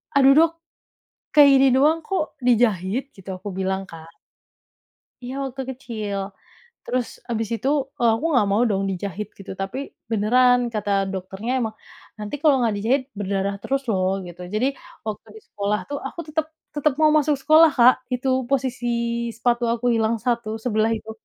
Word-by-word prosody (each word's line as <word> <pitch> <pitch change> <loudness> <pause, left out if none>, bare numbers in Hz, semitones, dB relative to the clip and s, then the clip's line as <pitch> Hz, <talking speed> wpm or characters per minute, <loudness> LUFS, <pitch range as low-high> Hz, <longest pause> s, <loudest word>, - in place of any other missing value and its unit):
"Aduh 275 0 +7
dok, 325 +3 +5 0.8
kayak 290 -2 +8
gini 270 0 +5
doang 300 +5 +4
kok 375 -5 -2
dijahit?" 230 +1 +2
gitu 195 0 -12
aku 205 - -5
bilang 190 0 -2
Kak. 165 0 -12 1.1
Iya 255 +2 -5
waktu 265 0 -5
kecil, 215 -6 -5 0.7
terus 250 -1 -1 0.2
habis 225 -1 -2
itu, 260 - -4 0.3
e - - +1
aku 225 - -2
nggak 230 -7 +3
mau 210 - +3
dong 195 -1 0
dijahit 195 +2 -4
gitu, 195 - -8
tapi 195 +6 -4 0.3
beneran 245 +4 +4
kata 205 -1 -2 0.2
dokternya 190 +5 -5
emang, 220 -2 -3 0.4
"Nanti 210 +6 -4
kalau 300 -4 +5
nggak 225 -3 +1
dijahit, 250 +6 +1 0.2
berdarah 200 0 -1
terus 275 +4 -1
loh." 190 -1 0
gitu, 175 +1 -11
jadi 230 +5 +2 0.4
waktu 210 - -5
di - - -14
sekolah 205 +1 -1
tuh 285 - -3
aku - - -10
tetap 315 0 -1 0.3
tetap 295 -2 0
mau 310 -1 +4
masuk 300 -2 +3
sekolah 315 +3 +6
Kak, 255 -2 +6
itu 250 +1 -1 0.2
posisi 255 -3 -1 0.4
sepatu 235 +1 0
aku 240 +1 +1
hilang 225 0 +1
1 230 -1 -2
sebelah 220 -1 0
itu, 220 - -9
235 Hz, 160 wpm, -23 LUFS, 205-270 Hz, 1.1 s, kayak